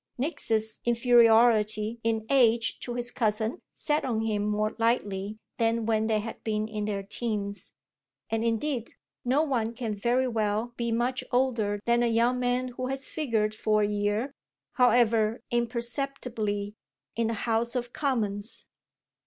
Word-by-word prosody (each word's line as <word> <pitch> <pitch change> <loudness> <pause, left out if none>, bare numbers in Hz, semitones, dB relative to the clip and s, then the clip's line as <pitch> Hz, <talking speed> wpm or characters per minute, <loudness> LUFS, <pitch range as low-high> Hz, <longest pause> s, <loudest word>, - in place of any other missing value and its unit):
Nick's 225 -6 -1
inferiority 230 -2 +4
in 225 -1 0
age 235 -4 +3
to 240 - -5
his 245 0 -2
cousin 220 +4 -1
sat 300 0 0
on 230 -4 0
him 215 -2 0
more 210 +1 0
lightly 210 -3 0 0.2
than 230 0 +1
when 220 -1 +1
they 220 -1 +2
had 220 +2 -6
been 215 -1 -1
in 215 -1 -3
their 200 -2 -2
teens; 200 -2 -3 0.6
and 225 0 0
indeed 235 +2 -1 0.3
no 265 +5 +2
one 235 -6 -1
can 230 -4 -3
very 240 +5 +1
well 220 0 -1
be 235 -1 -2
much 245 +3 0
older 235 -5 +1
than 235 0 +3
a 240 - +3
young 235 +2 +2
man 250 +1 0
who 255 +1 -4
has 270 0 -3
figured 225 -8 0
for 215 -1 +1
a - - +2
year, 210 +5 -1 0.4
however 230 -2 +3
imperceptibly, 235 -3 -2 0.4
in 230 -1 +1
the 230 - -1
House 235 +1 0
of 240 -1 -3
Commons. 220 -7 -1
230 Hz, 145 wpm, -28 LUFS, 215-245 Hz, 0.6 s, inferiority